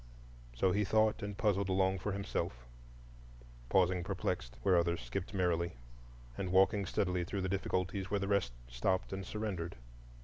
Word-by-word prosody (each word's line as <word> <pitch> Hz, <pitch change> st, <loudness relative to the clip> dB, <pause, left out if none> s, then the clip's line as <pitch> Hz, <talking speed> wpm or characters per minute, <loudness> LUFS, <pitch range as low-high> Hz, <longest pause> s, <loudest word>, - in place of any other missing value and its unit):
So 95 Hz, +10 st, +3 dB
he 105 Hz, +3 st, +2 dB
thought 110 Hz, +2 st, +3 dB
and 100 Hz, -1 st, -4 dB
puzzled 100 Hz, -3 st, +1 dB
along 95 Hz, 0 st, +2 dB
for 105 Hz, -, -2 dB
himself,—pausing -, -, -3 dB
perplexed 90 Hz, -9 st, -3 dB
where 95 Hz, -, +5 dB
others 85 Hz, 0 st, +2 dB
skipped 60 Hz, +11 st, -4 dB
merrily, 85 Hz, -3 st, +1 dB, 0.6 s
and 95 Hz, +5 st, -3 dB
walking 95 Hz, +2 st, +4 dB
steadily 90 Hz, -2 st, 0 dB
through 95 Hz, +2 st, -3 dB
the 95 Hz, -, -1 dB
difficulties 95 Hz, 0 st, -1 dB
where 100 Hz, -, +1 dB
the 100 Hz, -, -2 dB
rest 100 Hz, -11 st, +1 dB
stopped 90 Hz, +12 st, 0 dB
and 95 Hz, 0 st, -3 dB
surrendered. 95 Hz, -6 st, -3 dB
95 Hz, 145 wpm, -34 LUFS, 80-100 Hz, 0.6 s, where